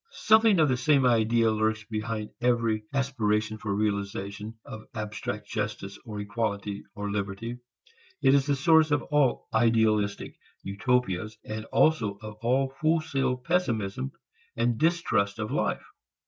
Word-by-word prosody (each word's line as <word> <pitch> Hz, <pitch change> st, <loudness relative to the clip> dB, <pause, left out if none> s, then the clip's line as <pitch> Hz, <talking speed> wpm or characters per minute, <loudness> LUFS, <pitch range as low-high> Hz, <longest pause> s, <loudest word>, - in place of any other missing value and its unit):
Something 220 Hz, -3 st, +4 dB
of 155 Hz, -, +5 dB
the 130 Hz, -2 st, +1 dB
same 135 Hz, +1 st, +3 dB
idea 115 Hz, -1 st, +3 dB
lurks 110 Hz, 0 st, 0 dB
behind 110 Hz, 0 st, -4 dB
every 115 Hz, -3 st, +1 dB
aspiration 110 Hz, -6 st, 0 dB
for 105 Hz, -, -4 dB
realization 100 Hz, +1 st, -3 dB
of 110 Hz, 0 st, -9 dB
abstract 105 Hz, -1 st, -5 dB
justice 105 Hz, -2 st, -4 dB
or 105 Hz, -4 st, -7 dB
equality 105 Hz, -1 st, -3 dB
or 105 Hz, 0 st, -4 dB
liberty. 105 Hz, +4 st, -4 dB, 0.6 s
It 135 Hz, -, +4 dB
is 140 Hz, 0 st, +3 dB
the 145 Hz, -, +2 dB
source 160 Hz, +2 st, +4 dB
of 145 Hz, -1 st, +1 dB
all 145 Hz, -4 st, +1 dB
"idealistic" 110 Hz, -3 st, +1 dB, 0.2 s
utopias 110 Hz, -1 st, -1 dB
and 110 Hz, 0 st, -5 dB
also 115 Hz, -8 st, +2 dB
of 105 Hz, -1 st, -8 dB
all 130 Hz, +3 st, +1 dB
wholesale 155 Hz, -5 st, +1 dB
pessimism 115 Hz, -, -1 dB, 0.5 s
and 115 Hz, 0 st, +1 dB
distrust 120 Hz, -12 st, +1 dB
of 110 Hz, -1 st, -4 dB
life. -, -, -1 dB
110 Hz, 135 wpm, -27 LUFS, 105-130 Hz, 0.6 s, of